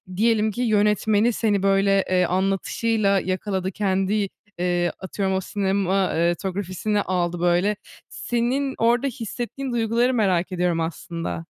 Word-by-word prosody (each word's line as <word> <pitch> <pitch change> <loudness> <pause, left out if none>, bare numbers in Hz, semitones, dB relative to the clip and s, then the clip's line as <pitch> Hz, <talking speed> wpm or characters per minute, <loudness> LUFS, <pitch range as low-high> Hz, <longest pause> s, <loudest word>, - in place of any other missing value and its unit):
diyelim 220 +1 +2
ki 240 +5 -4
yönetmeni 210 0 +2
seni 205 -3 0
böyle, 195 0 +3
eee, 180 -1 +3
anlatışıyla 195 +3 +1
yakaladı. 190 0 -2
Kendi, 195 +1 0 0.3
eee, 175 -1 +1
atıyorum 190 0 -2
o 190 - 0
sinema, 195 -1 0
eee, 170 +1 +2
tografisini 195 +2 -2
aldı 175 -2 -1
böyle. 175 +4 +2 0.3
Senin 255 +3 -1
orda 240 +4 +2
hissettiğin 245 +2 -5
duyguları 235 +2 +1
merak 190 -6 +1
ediyorum 180 -2 0
aslında. 165 +1 -4
195 Hz, 125 wpm, -23 LUFS, 185-220 Hz, 0.3 s, böyle